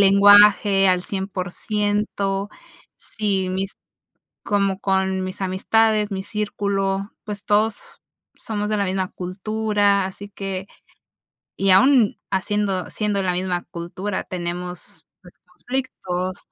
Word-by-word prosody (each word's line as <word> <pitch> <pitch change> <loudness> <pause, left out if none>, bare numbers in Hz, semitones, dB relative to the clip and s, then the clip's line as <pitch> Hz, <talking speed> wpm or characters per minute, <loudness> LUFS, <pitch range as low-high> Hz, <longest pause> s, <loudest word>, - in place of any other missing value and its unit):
lenguaje 200 0 +7
al 180 -1 +2
100% 200 +1 -2 0.5
Sí, 195 -3 -1
mis 190 +1 -2 0.7
como 200 -2 +1
con 190 -1 0
mis 185 +1 -6
amistades, 210 +3 +2
mi 190 -1 -3
círculo, 200 -1 -2
pues 205 -1 -6
todos, 210 +1 +2 0.6
somos 210 -1 -3
de 215 - +1
la 200 - +1
misma 185 0 -1
cultura, 205 +1 0
así 195 +2 -6
que 195 -2 -5 0.9
y 195 -1 +3
aún, 230 +3 +5
haciendo 195 -1 -1
siendo 205 -2 -1
la 180 -1 +1
misma 180 -1 -1
cultura, 185 +4 -4
tenemos, 180 0 -5 0.2
pues - - -15
conflictos. 185 -8 -4
195 Hz, 110 wpm, -22 LUFS, 185-210 Hz, 0.9 s, lenguaje